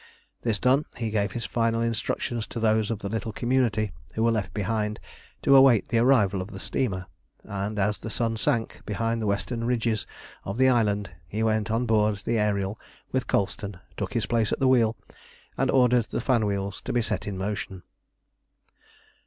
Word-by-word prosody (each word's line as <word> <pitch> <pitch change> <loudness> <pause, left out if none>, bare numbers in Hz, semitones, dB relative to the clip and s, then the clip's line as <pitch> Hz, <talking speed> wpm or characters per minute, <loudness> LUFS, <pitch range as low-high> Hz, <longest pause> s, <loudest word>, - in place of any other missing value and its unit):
This 115 -3 0
done, 135 +6 +3
he 115 -3 -2
gave 100 -1 0
his 120 - -3
final 115 -1 +1
instructions 115 0 -1
to - - -5
those 110 -1 +2
of 115 - -1
the 100 - -5
little 110 +2 -3
community 115 -3 +1 0.2
who 110 - 0
were 115 - +4
left 100 -5 -1
behind 105 +2 -1 0.4
to 140 - +6
await 135 -5 +6
the 115 - +2
arrival 105 -7 +4
of 95 - -6
the - - -8
steamer, 100 -9 -2 0.4
and 100 +2 -4
as 100 +1 +1
the 115 - -6
sun 115 0 -1
sank 115 +1 0
behind 115 +2 -1
the 110 - -1
western 115 +4 -1
ridges 115 -2 0 0.4
of 100 +3 -4
the 130 0 +5
island, 105 -6 +1 0.2
he 105 +7 -2
went 110 -1 +1
on 115 +3 +1
board 105 -2 +3
the 115 -1 +1
Ariel 105 -1 0 0.3
with 130 0 -1
Colston, 100 -1 -1 0.2
took - - -4
his - - 0
place 115 -2 +1
at - - +1
the 135 - +3
wheel, 115 -4 +3 0.6
and - - +1
ordered 125 -3 +4
the 120 - -3
fan 120 -5 +2
wheels 100 -1 -3
to - - -2
be 120 -1 +1
set - - -1
in 100 -2 -3
motion. 95 -2 -4
110 Hz, 185 wpm, -26 LUFS, 105-120 Hz, 0.6 s, to